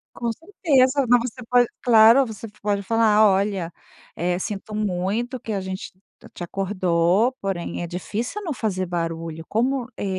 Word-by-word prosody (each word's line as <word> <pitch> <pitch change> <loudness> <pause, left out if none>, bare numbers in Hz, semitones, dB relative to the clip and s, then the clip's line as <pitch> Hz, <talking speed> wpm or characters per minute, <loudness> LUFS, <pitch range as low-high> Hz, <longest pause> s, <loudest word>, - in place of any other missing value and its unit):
Com 235 -1 -2
certeza, 285 - +1
não 245 +1 +6
você 245 +1 -5
pode 245 -1 +5 0.2
claro, 230 +2 +7
você 225 -2 -8 0.2
pode 205 -1 0
falar: 220 0 +4
"Olha, 195 -3 0 0.7
sinto 205 +2 -5
muito 210 +5 -2
que 225 - -5
a 200 - -1
gente 190 0 -6 0.4
te - - -9
acordou 185 +3 +1
porém 190 -3 -3
é - - -3
difícil 210 - -4
não 340 -6 -3
fazer 190 -6 -2
barulho", 165 -2 -4
como, 255 +2 0
é - - -4
210 Hz, 145 wpm, -23 LUFS, 185-245 Hz, 0.7 s, claro